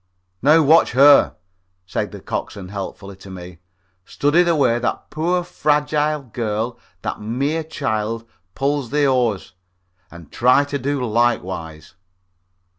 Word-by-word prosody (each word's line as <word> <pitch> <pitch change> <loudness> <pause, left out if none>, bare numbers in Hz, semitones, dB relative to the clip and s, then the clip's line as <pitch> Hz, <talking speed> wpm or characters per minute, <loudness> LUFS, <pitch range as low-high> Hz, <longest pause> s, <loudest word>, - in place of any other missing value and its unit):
"Now, 155 +4 +5
watch 155 0 +4
her," 140 +3 +6 0.5
said - - -3
the - - -9
coxswain, 95 -2 -5
helpfully, 100 0 -7
to 95 - -13
me; 90 -2 -10 0.4
"study 145 - +2
the 170 -2 +2
way 120 -5 +2
that 125 - -3
poor 175 +3 0
fragile 150 -2 0
girl, 115 -1 -3 0.2
that - - -4
mere 140 +9 -1
child, 115 -7 -3 0.3
pulls 140 -2 -1
the 145 +1 +1
oars, 120 -9 0 0.6
and 85 -3 -14
try 125 +4 +4
to 140 0 -4
do 135 0 -2
likewise." 95 -8 -2
125 Hz, 125 wpm, -20 LUFS, 105-145 Hz, 0.6 s, her